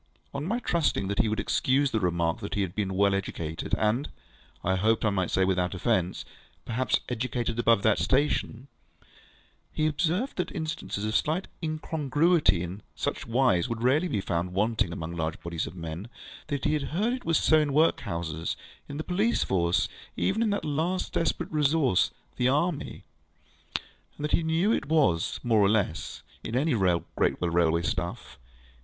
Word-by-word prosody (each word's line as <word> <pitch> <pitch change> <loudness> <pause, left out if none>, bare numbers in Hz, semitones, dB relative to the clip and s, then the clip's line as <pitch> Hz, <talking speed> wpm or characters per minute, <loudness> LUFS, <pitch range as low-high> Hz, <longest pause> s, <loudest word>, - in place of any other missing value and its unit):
On 140 0 -3
my 205 +9 0
trusting 170 - 0
that 100 - -2
he 110 - +3
would 110 - -1
excuse 135 +1 +2
the 110 - +1
remark 85 -3 0
that 100 - -5
he 100 - +1
had 90 -2 -4
been 95 -3 -2
well 100 0 +3
educated, 85 -5 -2
and 110 +6 +1 0.5
(I 95 +1 +2
hoped 110 +4 +2
I 110 - +3
might 95 -3 0
say 95 - +2
without 90 -1 0
offence) 95 -2 0 0.4
perhaps 125 +3 0
educated 120 -1 -2
above 115 -4 +4
that 110 -2 +3
station, 135 -2 0 1.0
he 155 - 0
observed 175 - 0
that 180 - -1
instances 155 - -3
of 110 +1 -1
slight 165 +5 +1
incongruity 155 - +1
in 90 +4 -6
such - - -3
wise 120 -4 +2
would 115 0 -3
rarely 145 +8 +3
be 110 - -1
found 85 0 -2
wanting 105 -1 +1
among 85 0 -5
large 80 +2 -2
bodies 85 -1 -3
of - - -9
men; 85 +4 -6 0.4
that 145 -3 -3
he - - +2
had 150 +1 -2
heard 225 +5 +2
it 255 -1 -5
was 165 -2 +2
so 155 - +4
in 150 -2 +1
workhouses, 85 - 0 0.3
in 145 - -5
the 155 - -3
police 205 +8 +1
force, 85 -2 +1 0.3
even 90 - +1
in 230 - +2
that 200 0 -1
last 160 +5 -1
desperate 165 - -1
resource, 150 - +3 0.3
the 125 - +2
army; 150 +3 -1 1.1
and - - -7
that 150 - -2
he - - +3
knew 165 +6 +2
it - - 0
was 140 - +3
so, - - -4
more 115 -3 +3
or 100 - +5
less, 100 -7 -1 0.2
in 115 - -4
any 145 +3 +2
great 90 -6 +1
railway 85 -1 +2
staff. 85 -6 -4
115 Hz, 175 wpm, -28 LUFS, 90-155 Hz, 1.1 s, or